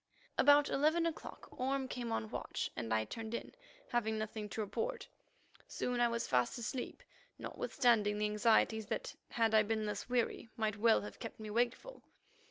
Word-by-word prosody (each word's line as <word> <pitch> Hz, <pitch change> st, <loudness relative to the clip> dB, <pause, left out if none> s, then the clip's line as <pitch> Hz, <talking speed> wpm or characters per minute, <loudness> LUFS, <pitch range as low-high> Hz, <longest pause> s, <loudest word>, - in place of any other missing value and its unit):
About 290 Hz, +1 st, +6 dB
eleven 315 Hz, +4 st, +2 dB
o'clock 330 Hz, -2 st, -5 dB
Orme 265 Hz, +1 st, -1 dB
came 240 Hz, -2 st, -4 dB
on 220 Hz, -1 st, -1 dB
watch, -, -, -3 dB
and 115 Hz, -2 st, -4 dB
I 110 Hz, 0 st, +2 dB
turned 225 Hz, -, -5 dB
in, -, -, -6 dB, 0.4 s
having 220 Hz, -2 st, 0 dB
nothing 215 Hz, -1 st, -4 dB
to 220 Hz, -, -3 dB
report. 465 Hz, -, -3 dB, 0.6 s
Soon 250 Hz, -1 st, -2 dB
I 240 Hz, -, +5 dB
was 235 Hz, 0 st, -1 dB
fast 125 Hz, -, +2 dB
asleep, 245 Hz, +2 st, -4 dB, 0.3 s
notwithstanding 215 Hz, -5 st, +1 dB
the 210 Hz, -, +1 dB
anxieties 220 Hz, 0 st, +3 dB
that, -, -, -3 dB, 0.2 s
had 225 Hz, -2 st, +2 dB
I 220 Hz, -, +7 dB
been 215 Hz, 0 st, -1 dB
less 210 Hz, +3 st, -4 dB
weary, 240 Hz, -2 st, 0 dB
might 215 Hz, -2 st, 0 dB
well 225 Hz, +1 st, +5 dB
have 205 Hz, -, -8 dB
kept 230 Hz, -, -7 dB
me 215 Hz, -1 st, -6 dB
wakeful. 245 Hz, -, -1 dB
225 Hz, 170 wpm, -35 LUFS, 215-250 Hz, 0.6 s, I